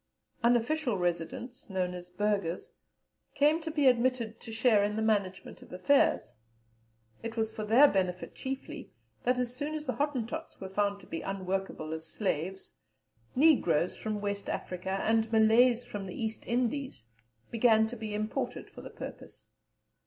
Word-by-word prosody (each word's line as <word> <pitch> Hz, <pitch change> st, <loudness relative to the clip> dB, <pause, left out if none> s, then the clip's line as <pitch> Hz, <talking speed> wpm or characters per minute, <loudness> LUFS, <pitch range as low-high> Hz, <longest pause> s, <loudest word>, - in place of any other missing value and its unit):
Unofficial 245 Hz, +1 st, +2 dB
residents, 180 Hz, +9 st, -3 dB
known 185 Hz, -2 st, -1 dB
as 180 Hz, 0 st, -8 dB
Burghers, 200 Hz, -2 st, -1 dB, 0.6 s
came 300 Hz, +3 st, +4 dB
to 320 Hz, -, -4 dB
be 300 Hz, -2 st, +1 dB
admitted 240 Hz, -3 st, +2 dB
to 225 Hz, -, -9 dB
share 220 Hz, -2 st, +4 dB
in 210 Hz, +1 st, 0 dB
the 220 Hz, -, -1 dB
management 200 Hz, -4 st, -1 dB
of -, -, -15 dB
affairs. 285 Hz, -, +2 dB, 0.9 s
It 230 Hz, 0 st, -6 dB
was 220 Hz, -1 st, 0 dB
for 215 Hz, -, -5 dB
their 235 Hz, +7 st, +7 dB
benefit 185 Hz, -5 st, -1 dB
chiefly, 270 Hz, +3 st, -6 dB, 0.4 s
that 250 Hz, +1 st, +3 dB
as 250 Hz, 0 st, -2 dB
soon 295 Hz, +3 st, -3 dB
as 305 Hz, -1 st, -4 dB
the 255 Hz, -, -1 dB
Hottentots 290 Hz, +2 st, -3 dB
were 190 Hz, -, -6 dB
found 200 Hz, +1 st, 0 dB
to -, -, -14 dB
be 165 Hz, -, -5 dB
unworkable 190 Hz, -4 st, -3 dB
as 160 Hz, 0 st, -6 dB
slaves, 190 Hz, 0 st, -3 dB, 0.6 s
Negroes 250 Hz, -, +4 dB
from 215 Hz, -1 st, -3 dB
West 200 Hz, 0 st, -3 dB
Africa 190 Hz, +2 st, -3 dB
and 225 Hz, 0 st, +2 dB
Malays 230 Hz, +2 st, +5 dB
from 205 Hz, -5 st, -6 dB
the 180 Hz, -, -7 dB
East 225 Hz, -1 st, -4 dB
Indies 250 Hz, -, -1 dB, 0.5 s
began 225 Hz, -1 st, +5 dB
to 235 Hz, +3 st, -5 dB
be 215 Hz, -2 st, -5 dB
imported 215 Hz, +1 st, -3 dB
for -, -, -10 dB
the -, -, -9 dB
purpose. -, -, -9 dB
220 Hz, 155 wpm, -30 LUFS, 195-250 Hz, 0.9 s, their